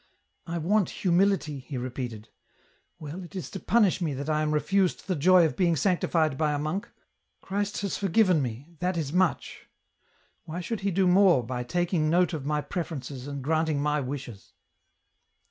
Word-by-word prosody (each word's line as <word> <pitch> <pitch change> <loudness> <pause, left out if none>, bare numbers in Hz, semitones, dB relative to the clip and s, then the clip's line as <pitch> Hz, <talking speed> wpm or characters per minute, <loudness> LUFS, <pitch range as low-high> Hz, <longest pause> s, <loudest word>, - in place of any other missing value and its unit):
" - - -39
I 170 +1 -3
want 190 +3 +1
humility," 180 -5 +1
he 135 +1 -7
repeated. 120 -3 -5 0.3
" - - -39
Well, 155 +4 -7
it 175 - -12
is 185 - -5
to 195 - -5
punish 210 -5 +2
me 155 -5 -1
that 140 +3 -3
I 155 0 +1
am 155 0 0
refused 185 +5 +1
the 185 - -1
joy 175 +3 +5
of 160 - -1
being 175 -4 +2
sanctified 160 -3 +1
by 150 -2 +2
a - - 0
monk. 155 +7 -3 0.5
Christ 205 +1 -3
has 200 -2 -2
forgiven 190 -3 +3
me, 130 +6 -5
that 180 0 -1
is 150 -3 -3
much. 180 -1 0 0.8
Why 165 +1 -5
should 210 +5 -3
He 200 - -1
do 190 +1 +2
more 180 -7 +5
by 125 0 -3
taking 170 +3 0
note 175 +2 +3
of 145 -3 -4
my 150 0 0
preferences 145 -5 -5
and 140 -2 -5
granting 160 0 +1
my 150 +1 +1
wishes 130 -6 -7
160 Hz, 180 wpm, -27 LUFS, 145-185 Hz, 0.8 s, joy